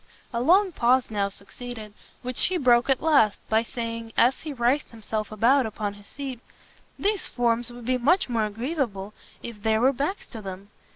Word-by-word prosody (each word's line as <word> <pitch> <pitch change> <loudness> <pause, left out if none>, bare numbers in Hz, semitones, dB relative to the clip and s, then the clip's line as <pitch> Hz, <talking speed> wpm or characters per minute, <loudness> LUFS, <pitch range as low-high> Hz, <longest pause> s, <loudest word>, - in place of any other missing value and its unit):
A 235 - 0
long 370 +8 +4
pause 250 -4 +2
now 200 -2 0
succeeded, 215 +2 -9 0.3
which 250 0 0
he 370 - 0
broke 245 -3 +4
at 265 +1 +2
last, 280 -10 +4
by 220 0 +4
saying, 230 -2 -5
as 250 +3 +4
he 310 - -5
writhed 255 +2 +1
himself 220 -1 -4
about 235 +4 +3
upon 210 -1 -4
his 205 0 -16
seat, 270 -4 -6 0.6
"These 410 -1 +1
forms 240 0 0
would 240 -1 -10
be 255 +1 +1
much 335 +10 +3
more 225 -3 0
agreeable 215 -3 -3 0.3
if 230 -3 -8
there 220 +1 +2
were 260 +4 +4
backs 290 +10 -2
to 225 - -6
them. 195 0 -8
240 Hz, 180 wpm, -25 LUFS, 220-265 Hz, 0.6 s, long